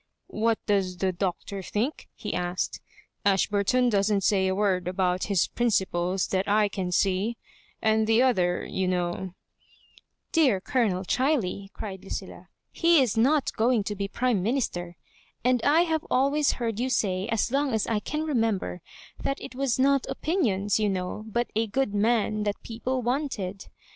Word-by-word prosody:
" -, -, -54 dB, 0.2 s
What 230 Hz, -1 st, +3 dB
does 190 Hz, -3 st, 0 dB
the 190 Hz, +1 st, +1 dB
Doctor 190 Hz, +2 st, -3 dB
think 225 Hz, -, -3 dB
?" -, -, -51 dB
he -, -, -5 dB
asked. 180 Hz, 0 st, -2 dB, 0.2 s
" -, -, -44 dB
Ashburton 205 Hz, +6 st, +2 dB
doesn't 200 Hz, -2 st, +2 dB
say 190 Hz, -1 st, +3 dB
a 190 Hz, -, 0 dB
word 190 Hz, -3 st, +1 dB
about 180 Hz, 0 st, 0 dB
his 195 Hz, -4 st, +2 dB
principles 190 Hz, -5 st, 0 dB
that 190 Hz, +1 st, 0 dB
I 210 Hz, 0 st, +3 dB
can 190 Hz, -3 st, -3 dB
see; 195 Hz, +5 st, +1 dB, 0.5 s
and 220 Hz, 0 st, +3 dB
the 225 Hz, +1 st, +4 dB
other, 180 Hz, -9 st, +1 dB
you 190 Hz, -1 st, -2 dB
know 180 Hz, 0 st, -2 dB, 0.3 s
" -, -, -31 dB
" -, -, -53 dB
Dear 270 Hz, -12 st, +3 dB
Colonel 195 Hz, -3 st, 0 dB
Chiley," 220 Hz, -, 0 dB
cried 190 Hz, -3 st, -7 dB
Lucilla, -, -, -7 dB, 0.2 s
" -, -, -53 dB
he 335 Hz, -1 st, +6 dB
is 255 Hz, -6 st, +2 dB
not 270 Hz, +5 st, +2 dB
going 230 Hz, -1 st, +2 dB
to 210 Hz, +1 st, -4 dB
be 200 Hz, 0 st, -2 dB
Prime 240 Hz, -1 st, 0 dB
Minister; 180 Hz, -7 st, -2 dB, 0.5 s
and 250 Hz, -1 st, +3 dB
I 295 Hz, +7 st, +4 dB
have 320 Hz, -3 st, 0 dB
al 270 Hz, +2 st, +3 dB
ways 295 Hz, -1 st, +2 dB
heard 230 Hz, -3 st, -3 dB
you 255 Hz, +2 st, 0 dB
say, 195 Hz, -6 st, 0 dB
as 225 Hz, +1 st, 0 dB
long 280 Hz, 0 st, +1 dB
as 220 Hz, -2 st, 0 dB
I 220 Hz, -2 st, 0 dB
can 300 Hz, +8 st, -3 dB
remember, 225 Hz, -, -1 dB, 0.4 s
that 275 Hz, -, -2 dB
it -, -, -8 dB
was 265 Hz, -1 st, 0 dB
not 275 Hz, 0 st, +3 dB
opinions, 215 Hz, -, 0 dB
you 210 Hz, -1 st, +2 dB
know, 190 Hz, +3 st, -3 dB
but 235 Hz, +2 st, -1 dB
a 225 Hz, +1 st, +1 dB
good 240 Hz, 0 st, -1 dB
man 215 Hz, 0 st, +1 dB
that 205 Hz, 0 st, -1 dB
people 245 Hz, +3 st, -3 dB
wanted. 230 Hz, -7 st, -2 dB
210 Hz, 180 wpm, -26 LUFS, 190-250 Hz, 0.5 s, he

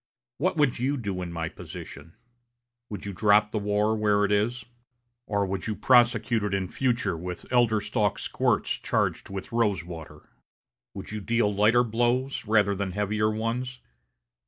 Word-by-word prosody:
What 185 Hz, +3 st, 0 dB
would 145 Hz, -6 st, +2 dB
you 135 Hz, +4 st, 0 dB
do 100 Hz, -6 st, -3 dB
in 90 Hz, -1 st, -5 dB
my 85 Hz, -1 st, -3 dB
position? 80 Hz, -2 st, -10 dB, 0.7 s
Would 105 Hz, -, -7 dB
you 100 Hz, -, -4 dB
drop 105 Hz, +2 st, +3 dB
the 110 Hz, -, -1 dB
war 105 Hz, +1 st, +1 dB
where 105 Hz, -1 st, +2 dB
it 100 Hz, -, -2 dB
is? 105 Hz, +3 st, 0 dB, 0.6 s
Or 100 Hz, -1 st, 0 dB
would 95 Hz, +1 st, -3 dB
you 110 Hz, -, -2 dB
prosecute 120 Hz, -2 st, +3 dB
it 100 Hz, -1 st, 0 dB
in 95 Hz, -1 st, -1 dB
future 125 Hz, -8 st, 0 dB
with 90 Hz, +2 st, -6 dB
elder 120 Hz, -3 st, +4 dB
stalk 105 Hz, -1 st, 0 dB
squirts -, -, 0 dB
charged -, -, -1 dB
with 95 Hz, -1 st, -6 dB
rose 105 Hz, -7 st, +1 dB
water? 80 Hz, -3 st, -10 dB, 0.7 s
Would -, -, -7 dB
you 105 Hz, 0 st, -4 dB
deal 115 Hz, 0 st, +1 dB
lighter 110 Hz, +4 st, +4 dB
blows 120 Hz, +4 st, 0 dB
rather 105 Hz, -2 st, +3 dB
than 95 Hz, -1 st, -3 dB
heavier 105 Hz, +2 st, 0 dB
ones? 115 Hz, +3 st, -3 dB
105 Hz, 160 wpm, -26 LUFS, 100-120 Hz, 0.7 s, elder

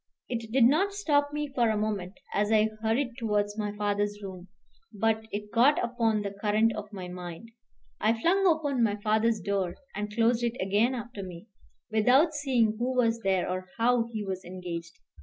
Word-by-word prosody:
It 230 Hz, -2 st, -4 dB
did 255 Hz, 0 st, +4 dB
not 325 Hz, +12 st, +4 dB
stop 290 Hz, -7 st, +1 dB
me 295 Hz, 0 st, -3 dB
for 240 Hz, -4 st, +2 dB
a 215 Hz, -, +1 dB
moment, 205 Hz, -3 st, -2 dB, 0.2 s
as 205 Hz, +1 st, +1 dB
I 220 Hz, 0 st, +4 dB
hurried 235 Hz, +4 st, +1 dB
towards 210 Hz, -2 st, 0 dB
my 210 Hz, -1 st, -2 dB
father's 205 Hz, 0 st, -1 dB
room, 185 Hz, -2 st, -8 dB, 0.4 s
but 220 Hz, +1 st, 0 dB
it 210 Hz, +1 st, -5 dB
got 245 Hz, +6 st, +5 dB
upon 230 Hz, -3 st, 0 dB
the 200 Hz, -1 st, -4 dB
current 220 Hz, +1 st, +3 dB
of 210 Hz, 0 st, -7 dB
my 190 Hz, -3 st, -6 dB
mind. 180 Hz, +4 st, -8 dB, 0.5 s
I 225 Hz, +1 st, +2 dB
flung 385 Hz, +8 st, +3 dB
open 295 Hz, -6 st, +1 dB
my 210 Hz, -3 st, +2 dB
father's 220 Hz, +2 st, +1 dB
door, 195 Hz, -1 st, -1 dB, 0.2 s
and 210 Hz, +1 st, -4 dB
closed 230 Hz, +2 st, +2 dB
it 235 Hz, +1 st, -1 dB
again 205 Hz, +7 st, +2 dB
after 235 Hz, -3 st, -6 dB
me, 185 Hz, +3 st, -9 dB, 0.4 s
without 255 Hz, +9 st, +4 dB
seeing 250 Hz, -7 st, +1 dB
who 255 Hz, +2 st, -1 dB
was 230 Hz, -2 st, +2 dB
there 190 Hz, -4 st, +1 dB
or 185 Hz, 0 st, -3 dB
how 235 Hz, 0 st, +2 dB
he 215 Hz, -2 st, -4 dB
was 190 Hz, -1 st, -4 dB
engaged. 175 Hz, -2 st, -7 dB
220 Hz, 180 wpm, -28 LUFS, 205-240 Hz, 0.5 s, got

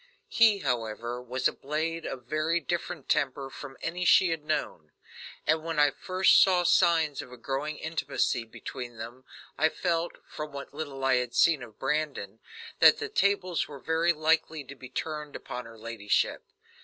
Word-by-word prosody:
He, 220 Hz, -3 st, +5 dB
however, 120 Hz, -2 st, -2 dB
was 125 Hz, +1 st, 0 dB
a -, -, -3 dB
blade 160 Hz, +3 st, -3 dB
of 130 Hz, -2 st, -6 dB
very 155 Hz, +5 st, 0 dB
different 175 Hz, 0 st, -4 dB
temper 140 Hz, -3 st, 0 dB
from 135 Hz, 0 st, -9 dB
any 175 Hz, +2 st, -2 dB
she 180 Hz, 0 st, +5 dB
had 165 Hz, -2 st, -3 dB
known; 150 Hz, -, -3 dB, 0.6 s
and 160 Hz, +1 st, +2 dB
when 165 Hz, -1 st, -3 dB
I 145 Hz, 0 st, +5 dB
first 185 Hz, 0 st, +4 dB
saw 180 Hz, -2 st, +4 dB
signs 165 Hz, -4 st, +3 dB
of 125 Hz, -, -12 dB
a 125 Hz, -, -10 dB
growing 145 Hz, +4 st, -3 dB
intimacy 160 Hz, -6 st, -1 dB
between 120 Hz, +1 st, -8 dB
them 120 Hz, +4 st, -9 dB, 0.3 s
I 160 Hz, -, +4 dB
felt, 170 Hz, 0 st, -1 dB
from 150 Hz, -1 st, -7 dB
what 140 Hz, 0 st, -8 dB
little 140 Hz, -3 st, -5 dB
I 130 Hz, -1 st, +4 dB
had 125 Hz, -1 st, -2 dB
seen 160 Hz, -5 st, +4 dB
of 115 Hz, -3 st, -11 dB
Brandon, 135 Hz, -8 st, -2 dB, 0.4 s
that -, -, +8 dB
the 440 Hz, 0 st, -4 dB
tables 200 Hz, -, +1 dB
were 145 Hz, -, -9 dB
very 160 Hz, +4 st, +1 dB
likely 160 Hz, -1 st, +1 dB
to 135 Hz, -, -10 dB
be 130 Hz, -2 st, -11 dB
turned 150 Hz, +2 st, -5 dB
upon 125 Hz, 0 st, -6 dB
her 115 Hz, 0 st, -13 dB
ladyship. 110 Hz, -2 st, -1 dB
150 Hz, 170 wpm, -28 LUFS, 125-165 Hz, 0.6 s, that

